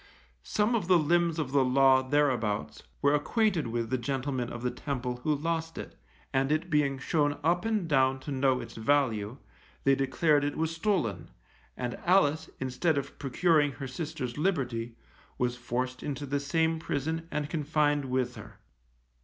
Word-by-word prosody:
Some 210 - 0
of 210 -7 0
the 185 -1 +6
limbs 170 +1 +2
of 150 -5 -2
the 140 -1 +4
Law 130 0 +5
thereabouts, 125 -7 0 0.2
were 140 +1 +4
acquainted 175 - +1
with 115 0 -3
the 130 - +1
gentleman 130 0 -2
of 120 0 -7
the 125 - 0
Temple 125 -2 -4
who 150 +5 0
lost 165 +2 -2
it, - - -7 0.4
and 135 +1 +1
it 155 +3 0
being 145 -3 +2
shown 145 +1 0
up 175 +5 +2
and 215 -6 0
down 135 -3 +3
to 145 - -6
know 130 -1 +2
its 115 -1 -8
value, 115 -2 0 0.5
they 135 - +5
declared 145 +3 +2
it 145 - -2
was 160 0 -1
stolen, 150 - -1 0.5
and 125 -1 -4
Alice, 160 -4 +3
instead 130 +5 0
of 140 - -4
procuring 145 +1 +2
her 135 +3 -6
sister's 130 -2 -5
liberty, 125 -10 -1 0.4
was 125 0 0
forced 125 +1 -3
into 145 0 -4
the 140 +1 -1
same 160 +3 +1
prison, 160 +2 -3
and 150 -2 -2
confined 150 -2 +1
with 130 -1 -1
her. - - -11
140 Hz, 165 wpm, -29 LUFS, 125-160 Hz, 0.5 s, the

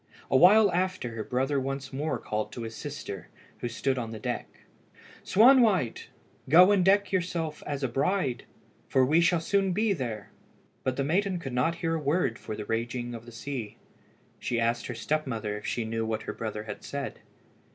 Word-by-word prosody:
A - - +3
while 200 +7 +7
after 185 -6 -1
her 115 -1 -5
brother 135 +4 0
once 135 0 -4
more 140 -1 -1
called 110 -1 -3
to 120 - -5
his 115 0 -6
sister, 140 - -6 0.3
who - - -2
stood 130 +3 -1
on 115 -2 -4
the 110 - -6
deck - - -3 0.8
"Swanwhite, 220 - +4 0.4
go 180 +6 +8
and 200 -3 +4
deck 200 +2 +3
yourself 170 -4 -2
as 145 -1 -3
a - - +2
bride, 135 +1 0 0.4
for 130 -1 +4
we 155 +6 +4
shall 175 0 +3
soon 195 +2 +1
be 215 +2 +2
there." 115 - -5 0.5
But 130 - 0
the 140 - 0
maiden 185 +6 +1
could 135 -7 -6
not 130 +7 +1
hear 165 - +1
a 165 - 0
word 145 -4 0
for 110 - -6
the 105 - -6
raging 120 +2 -2
of 115 0 -9
the - - -9
sea. 115 -2 -6 0.6
She 120 - -1
asked 115 0 0
her 125 - -5
step 155 +6 -1
mother 110 -4 -3
if 105 - -6
she 120 - -1
knew 115 0 -2
what 110 0 -2
her - - -5
brother 110 -1 -4
had 105 -1 -8
said. 140 -1 -5
135 Hz, 195 wpm, -28 LUFS, 115-175 Hz, 0.8 s, go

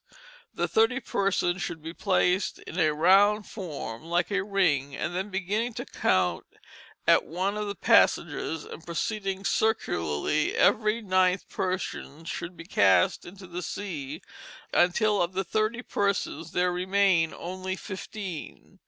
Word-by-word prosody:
the - - -1
thirty 225 +4 +3
persons 195 -5 0
should 170 -2 -4
be 160 +2 -7
placed 185 0 +1
in 175 - -7
a 155 -2 +4
round 195 +7 +4
form 150 - -6
like 175 +3 0
a 200 -1 +1
Ring, 160 -9 +1
and 170 +4 -3
then 190 +3 -2
beginning 205 +5 -2
to - - -5
count 90 -2 +1 0.6
at - - +5
one 185 +6 -2
of 210 0 -3
the 200 - -4
Passengers, 160 -2 +2
and 160 - -10
proceeding 195 +3 -3
circularly, 150 - 0
every 215 +1 +3
ninth 185 -1 +2
person 180 -4 -4
should 170 +1 -5
be 165 - -9
cast 95 - +3
into 190 +2 -11
the 175 0 -6
Sea, 155 -5 -5 0.5
until 205 +4 +3
of 175 +1 -1
the 190 +1 -1
thirty 215 +5 -1
persons 200 -7 -1
there 180 0 +1
remained 185 -2 +2
only 185 +1 -4
fifteen. 190 -3 -8
185 Hz, 140 wpm, -27 LUFS, 165-200 Hz, 0.6 s, at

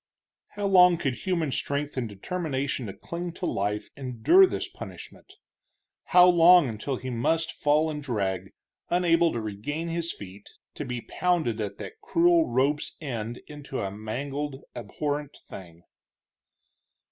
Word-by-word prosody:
How 205 - -2
long 180 -3 +6
could 135 -5 -1
human 170 -6 0
strength 145 +2 -2
and 125 -4 -2
determination 135 - -3
to 100 - -6
cling 170 - -6
to 180 - -5
life 105 - -2
endure 135 - +4
this - - -3
punishment! - - -11 0.7
how 180 -1 +7
long 175 -2 +7
until 115 +4 -3
he 130 +1 -6
must 160 +8 0
fall 150 +2 +2
and 150 -1 -4
drag, 95 -8 -2 0.4
unable 170 -1 +3
to 120 - -3
regain 115 +11 -4
his 170 0 -2
feet, 100 0 -10 0.2
to 150 - -5
be 125 -2 -4
pounded 160 -9 0
at 105 -2 -4
that 445 0 -9
cruel 345 -6 +3
rope's 145 +3 0
end 120 -6 -5
into 145 -2 -7
a 95 - -3
mangled, 135 +7 -5
abhorrent 145 -1 -4
thing! 85 -2 -11
145 Hz, 140 wpm, -27 LUFS, 115-170 Hz, 0.7 s, how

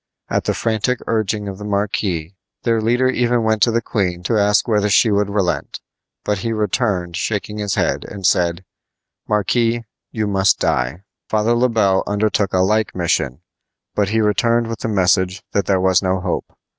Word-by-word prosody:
At - - -1
the - - 0
frantic 115 +3 0
urging 105 -2 -1
of 95 0 -6
the - - -7
marquis 100 -4 -2 0.3
their 115 -2 +1
leader 120 +4 +2
even 120 -2 +1
went 110 -1 +1
to 120 - +4
the 115 0 0
queen 90 -6 -2
to 110 - 0
ask 105 +2 +3
whether 105 -2 +2
she 110 +2 +4
would 100 0 +1
relent; 100 -3 -1 0.5
but 105 -2 0
he 115 +3 -2
returned 105 -5 -1
shaking 105 +2 -3
his 100 -2 -1
head, - - 0
and 100 -2 -7
said: 85 +1 +1 0.6
"Marquis, 115 +3 +1 0.3
you 110 -2 -2
must 95 -1 +2
die." 65 +9 -1 0.3
Father 110 +2 +2
Le 125 +2 +2
Bel 100 -5 +2
undertook 105 -1 0
a - - +1
like 105 +2 +1
mission, 80 -5 -1 0.5
but 100 -1 0
returned 110 +2 +2
with 115 -1 -5
the - - -3
message 95 -2 +1
that 100 - 0
there 95 -2 +2
was 95 -1 +3
no 95 -1 0
hope. 90 -1 -3
105 Hz, 175 wpm, -19 LUFS, 95-110 Hz, 0.6 s, to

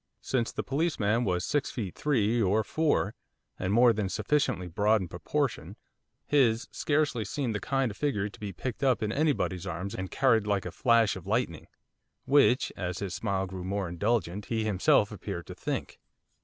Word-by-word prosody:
Since 120 -3 0
the - - -3
policeman 125 -7 0
was 90 -2 0
six 145 -1 0
feet 100 -7 -4
three 120 -5 +1
or 105 +2 +2
four, 145 -5 +1 0.5
and 95 - -1
more 120 +2 +6
than 105 -3 -2
sufficiently 110 -1 0
broad 105 +5 +2
in 95 - -4
proportion, - - -2 0.5
his 120 -5 +2
scarcely 145 -6 0
seemed 125 -1 -2
the 105 - -2
kind 135 -1 0
of 100 - -11
figure 105 -9 0
to 105 - -12
be 105 -2 -5
picked 120 +7 -5
up 130 -5 +2
in 110 - -1
anybody's 125 - 0
arms 90 +3 -4
and 95 0 -4
carried 115 -6 +2
like 100 -2 0
a 90 - -4
'flash 115 +3 +3
of 95 -1 -9
lightning,' 105 -7 -1 0.6
which, 135 -2 +4
as 90 -1 -3
his 100 -3 -4
smile 100 -3 -1
grew 95 -1 -7
more 100 0 -2
indulgent, 100 +1 -1
he 110 -1 -1
himself 105 0 +3
appeared 95 -3 -6
to - - -8
think. - - -4
105 Hz, 180 wpm, -29 LUFS, 95-125 Hz, 0.6 s, more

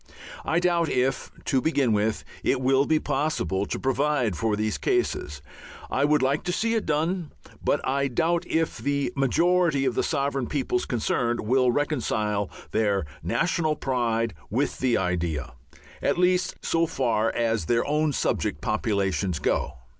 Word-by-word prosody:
I 165 - +1
doubt 170 -2 +2
if, 130 +1 0 0.2
to 135 -3 +2
begin 140 -7 +2
with, 105 +1 0 0.2
it - - +2
will 135 +2 +3
be 160 - +3
possible 135 - -1
to - - -3
provide 135 -5 +1
for 105 +6 0
these 110 0 -1
cases. 75 0 -1 0.5
I 140 - +2
would 150 -2 +3
like 140 +3 +2
to 180 - 0
see 225 +5 0
it 225 - -1
done, 165 +2 0 0.3
but - - 0
I 140 +1 +1
doubt 165 +7 +1
if 165 0 0
the 140 0 -1
majority 165 +2 +2
of 130 - +1
the - - +1
sovereign 140 -4 -1
peoples 130 -3 -1
concerned 120 0 0
will 125 +3 +3
reconcile 110 -8 -1 0.2
their 100 -5 +1 0.2
national 155 -2 0
pride 115 -4 0 0.2
with 130 +7 -1
the 125 -3 +2
idea, 85 -4 -2 0.5
at - - +1
least 180 0 +2
so 165 0 +1
far 115 -6 +1
as 115 -6 0
their 120 +4 +1
own 150 +1 +1
subject 75 - -1
populations 100 -4 0
go. 75 - -1
130 Hz, 155 wpm, -26 LUFS, 110-150 Hz, 0.5 s, will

